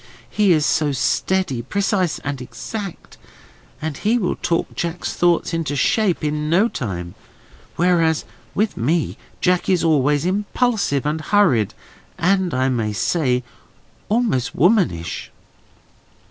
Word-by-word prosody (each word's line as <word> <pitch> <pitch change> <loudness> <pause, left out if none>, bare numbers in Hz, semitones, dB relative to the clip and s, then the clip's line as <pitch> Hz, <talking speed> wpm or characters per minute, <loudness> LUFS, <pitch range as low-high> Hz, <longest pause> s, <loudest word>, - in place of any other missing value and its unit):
He 205 -3 +3
is 155 -3 +3
so 150 -2 +1
steady, 130 +3 0
precise, 190 - 0
and 140 -2 -4
exact, 125 - -7 0.6
that 155 -2 -3
he 220 +4 +1
will 190 -7 0
talk 170 - -1
Jack's 170 0 -3
thoughts 175 0 +2
into 160 -4 -1
shape, 190 +3 +1
in 150 0 -1
no 190 +8 +4
time: 90 - -5 0.6
whereas 165 -3 +2 0.3
with 215 +1 0
me 155 +7 0 0.3
Jack 180 +1 +2
is 185 -3 +2
always 150 -2 +2
impulsive 205 - 0
and 155 +2 -1
hurried, 155 - +2 0.4
and, 185 +1 +2
I 130 0 +1
may 115 -5 -1
say, 125 - +1 0.7
almost 210 - 0
womanish." 170 - +1
165 Hz, 120 wpm, -21 LUFS, 135-190 Hz, 0.7 s, no